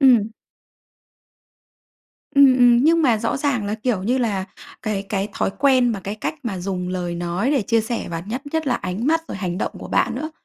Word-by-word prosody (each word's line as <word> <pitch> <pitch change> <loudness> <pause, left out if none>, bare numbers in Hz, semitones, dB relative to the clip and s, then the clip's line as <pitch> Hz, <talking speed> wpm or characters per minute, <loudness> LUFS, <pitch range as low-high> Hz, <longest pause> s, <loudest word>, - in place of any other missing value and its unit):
Ừm. 245 -6 +5 2.1
Ừm, 280 -2 +7
ừm, 245 -1 +6
nhưng 330 +1 +4
mà 245 -6 +4
rõ 230 +1 -1
ràng 275 -6 0
là, 210 - -1
kiểu 220 -3 -1
như 245 +6 +1
là, 205 -6 0 0.4
cái 210 -2 -2
cái 200 0 -1
thói - - 0
quen 260 -3 +4
mà 200 - -4
cái 200 +2 -5
cách 215 - -3
mà 215 -7 -3
dùng 180 0 -3
lời 180 -1 -3
nói 175 +8 -1
để 275 -7 +2
chia 230 +3 +2
sẻ 230 +2 -3
và 165 0 -4
nhất 245 +5 -4
nhất 320 -1 -1
là 255 - +2
ánh 195 +3 -3
mắt 325 +2 +3
rồi - - -5
hành 185 -2 -3
động - - -2
của - - -9
bạn - - +1
nữa, 310 - -4
225 Hz, 215 wpm, -21 LUFS, 195-260 Hz, 2.1 s, Ừm